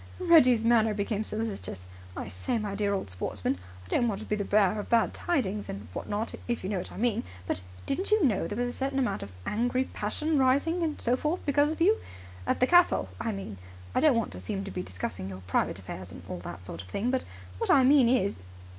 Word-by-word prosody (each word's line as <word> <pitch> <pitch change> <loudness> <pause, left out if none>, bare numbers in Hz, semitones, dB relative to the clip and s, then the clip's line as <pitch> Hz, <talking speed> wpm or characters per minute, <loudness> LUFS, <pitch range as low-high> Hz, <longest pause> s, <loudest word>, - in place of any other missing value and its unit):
Reggie's 255 -11 +5
manner 225 -2 +4
became 205 +1 -1
solicitous. 215 - -3 0.4
"I - - -4
say, 235 - -2
my 210 -2 -3
dear 200 0 0
old 190 - -2
sportsman, 90 0 -2 0.3
I - - -15
don't 240 - +2
want 205 -4 -1
to - - -7
be 210 - 0
the 205 - -2
bearer 205 0 +3
of 205 - -6
bad 230 -1 +3
tidings 210 - -1
and 100 0 -6
what - - -5
not, 210 +3 -2
if 240 -4 -2
you 190 - -2
know 195 - 0
what - - -5
I - - -10
mean, 235 -1 +1 0.2
but 90 - -2 0.2
didn't 365 +8 -1
you 425 -5 +4
know 210 -7 +1
there 205 - -4
was 245 0 0
a 245 - -4
certain 270 0 -2
amount 260 -3 0
of 100 - -7
angry 245 +4 +1
passion 290 +7 -1
rising 280 +7 +3
and 315 -3 -1
so 240 +1 +2
forth 305 +7 -2
because 290 +1 +3
of 320 - -5
you? 415 +6 +5 0.5
At - - 0
the - - +7
castle, 350 +5 +4
I 225 0 -1
mean. 190 - -6 0.3
I - - +2
don't 295 -6 +5
want 230 - -1
to - - -7
seem 195 -2 -3
to 195 - -6
be 180 - -3
discussing 90 - -5
your 95 -1 -8
private 90 - 0
affairs, 95 -1 -7
and 85 - -10
all 90 - -5
that 90 +1 -8
sort 85 -2 -5
of 90 - -13
thing, 215 - -1
but 260 - 0 0.4
what - - -1
I 270 - +6
mean 265 -2 +6
is... 200 - +1
220 Hz, 240 wpm, -29 LUFS, 195-265 Hz, 0.5 s, the